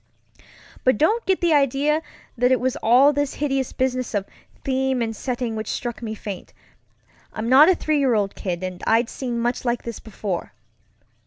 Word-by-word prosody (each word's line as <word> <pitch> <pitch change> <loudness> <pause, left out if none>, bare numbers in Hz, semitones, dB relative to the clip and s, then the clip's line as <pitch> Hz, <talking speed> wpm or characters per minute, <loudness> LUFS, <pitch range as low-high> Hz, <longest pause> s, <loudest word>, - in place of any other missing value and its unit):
But 255 -4 +3
don't 440 - +1
get 380 -1 +2
the 340 -2 +3
idea 285 +2 +2 0.3
that 250 +1 +2
it 255 - +4
was 260 0 0
all 255 +6 +5
this 285 -1 -1
hideous 270 -3 -1
business 255 -3 -1
of 200 -1 0 0.4
theme 265 -1 0
and 225 -1 -2
setting 240 -1 -3
which 215 -1 -4
struck 240 -1 -4
me 220 -2 -4
faint. 200 -3 -8 0.8
I'm 220 +1 -4
not 275 +7 +7
a 375 - +5
three 310 -3 0
year 260 -4 +3
old 205 -2 0
kid, 180 -2 -4
and 185 -1 -5
I'd 230 +1 +3
seen 245 -3 -4
much 240 +1 -1
like 240 -1 -1
this 235 -2 -6
before. 195 - -5
250 Hz, 180 wpm, -23 LUFS, 220-275 Hz, 0.8 s, not